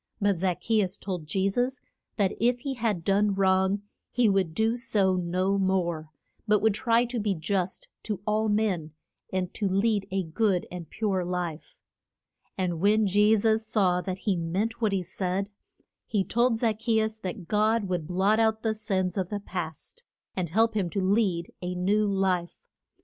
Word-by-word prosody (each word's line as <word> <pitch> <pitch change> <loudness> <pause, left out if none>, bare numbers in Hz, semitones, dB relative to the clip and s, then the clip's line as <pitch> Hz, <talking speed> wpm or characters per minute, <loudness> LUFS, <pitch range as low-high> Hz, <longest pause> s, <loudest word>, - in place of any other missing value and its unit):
But 200 -4 +1
Zac 180 -1 0
che 220 -1 +2
us 190 0 -2
told 180 -5 -5
Je 190 +5 +1
sus 245 +6 0 0.4
that 200 -3 +2
if 245 +2 +2
he 275 +1 -3
had 220 -8 -1
done 200 +1 +2
wrong 190 +1 +2 0.3
he 245 -2 +2
would 190 -5 +1
do 220 +3 +2
so 200 -6 +1
no 185 +2 0
more, 175 -5 0 0.4
but 210 0 +4
would 220 0 +3
try 235 +2 +2
to 240 0 -3
be 205 -2 0
just 185 +3 -2
to 210 -4 -4
all 215 +1 +1
men 195 -8 0 0.4
and 185 -1 -2
to 200 -3 -1
lead 200 +1 +1
a 190 0 -1
good 180 +2 0
and 175 -2 -7
pure 200 -4 -1
life. 175 -3 -4 0.8
And 180 -3 -1
when 210 +4 +4
Je 210 +3 +4
sus 220 +1 +1
saw 185 -5 +2
that 185 0 -4
he 200 -4 +2
meant 195 +8 -2
what 215 -2 +2
he 190 -2 0
said, 190 +1 -2 0.6
he 205 -3 +1
told 235 +3 +2
Zac 220 -2 0
che 225 0 +2
us 220 0 -1
that 185 -2 -6
God 215 +3 +2
would 175 -4 -2
blot 195 +5 +2
out 220 -1 +2
the 220 -1 +1
sins 195 -4 -1
of 185 -2 -1
the 205 - -3
past, 180 - -6 0.3
and 180 -3 -2
help 225 +6 +3
him 200 -5 0
to 195 - -2
lead 190 -3 +1
a 180 0 -3
new 205 +4 +2
life. 190 - -1
195 Hz, 180 wpm, -27 LUFS, 180-220 Hz, 0.8 s, but